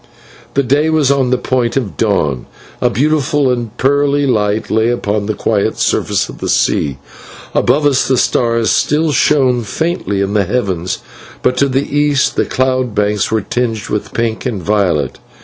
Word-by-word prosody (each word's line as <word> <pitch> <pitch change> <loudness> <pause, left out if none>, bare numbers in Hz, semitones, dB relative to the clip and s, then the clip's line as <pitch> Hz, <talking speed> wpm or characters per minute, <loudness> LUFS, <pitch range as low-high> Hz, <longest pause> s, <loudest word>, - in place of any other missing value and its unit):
The 140 - +3
day 145 +5 +2
was 155 -4 +2
on 135 -2 +1
the 125 - +2
point 125 -1 -1
of 115 -8 -2
dawn; 75 - 0 0.3
a - - +3
beautiful 145 +1 +1
and 120 -2 -4
pearly 145 +1 +2
light 105 -4 0
lay 110 +1 +2
upon 105 -4 -1
the 110 - -1
quiet 110 +1 0
surface - - 0
of - - -11
the - - -3
sea; 70 -2 +1 0.6
above 150 0 +2
us 140 -2 +2
the 130 - +2
stars 115 -2 +1
still 155 +2 +1
shone 130 -4 +2
faintly 110 - -2
in 100 +1 -1
the 105 -2 +2
heavens, 95 -5 -2 0.4
but 125 - +2
to 140 +1 +2
the 135 +2 -1
east 145 -2 +2
the - - +1
cloud 130 -3 0
banks 105 0 +1
were 110 -1 0
tinged 115 0 -2
with 105 - -3
pink 115 -1 -2
and 105 -7 -4
violet. 85 -9 0
120 Hz, 170 wpm, -15 LUFS, 105-140 Hz, 0.6 s, The